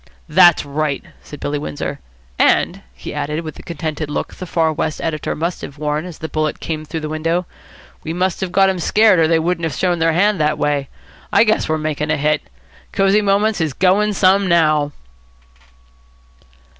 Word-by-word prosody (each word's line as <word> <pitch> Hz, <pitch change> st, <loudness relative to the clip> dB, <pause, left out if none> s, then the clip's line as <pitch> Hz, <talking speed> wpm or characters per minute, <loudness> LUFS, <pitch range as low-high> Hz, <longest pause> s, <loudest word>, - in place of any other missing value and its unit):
"That's 175 Hz, 0 st, +5 dB
right," 145 Hz, 0 st, -2 dB, 0.2 s
said 145 Hz, -, -11 dB
Billy 145 Hz, 0 st, -2 dB
Windsor. 75 Hz, -, -5 dB, 0.4 s
"And," -, -, +2 dB
he 60 Hz, 0 st, -9 dB
added, 150 Hz, +2 st, -2 dB
with 155 Hz, -2 st, -7 dB
the -, -, -12 dB
contented 160 Hz, -3 st, -4 dB
look 150 Hz, -, -3 dB
the 185 Hz, -, -8 dB
Far 160 Hz, -2 st, +1 dB
West 155 Hz, +1 st, -2 dB
editor 155 Hz, -2 st, -2 dB
must 170 Hz, +3 st, -3 dB
have 140 Hz, -, -8 dB
worn 150 Hz, +2 st, -2 dB
as 175 Hz, -3 st, -9 dB
the 160 Hz, -, -5 dB
bullet 155 Hz, -1 st, -2 dB
came 155 Hz, -2 st, -4 dB
through 160 Hz, +1 st, -5 dB
the 155 Hz, -, -4 dB
window, 165 Hz, +3 st, -1 dB, 0.6 s
"we 160 Hz, -, -4 dB
must 180 Hz, +2 st, -1 dB
have 190 Hz, -2 st, -2 dB
got 195 Hz, +1 st, +4 dB
them 190 Hz, -1 st, 0 dB
scared, 210 Hz, +1 st, +4 dB
or 160 Hz, -, +4 dB
they 165 Hz, 0 st, +3 dB
wouldn't 170 Hz, +1 st, -1 dB
have 160 Hz, -, -3 dB
shown 175 Hz, -2 st, 0 dB
their 165 Hz, 0 st, +2 dB
hand 200 Hz, +3 st, +2 dB
that 150 Hz, 0 st, +1 dB
way. 145 Hz, -2 st, -1 dB, 0.4 s
I 205 Hz, +1 st, +5 dB
guess 215 Hz, -6 st, +1 dB
we're 155 Hz, -, +1 dB
making 155 Hz, -1 st, -2 dB
a 155 Hz, -, +1 dB
hit. 150 Hz, +1 st, +1 dB, 0.5 s
Cosy 195 Hz, +2 st, +3 dB
Moments 205 Hz, -1 st, +1 dB
is 155 Hz, -4 st, -1 dB
going 200 Hz, +5 st, +2 dB
some 195 Hz, 0 st, +3 dB
now." 155 Hz, -4 st, +3 dB
160 Hz, 190 wpm, -18 LUFS, 150-180 Hz, 0.6 s, That's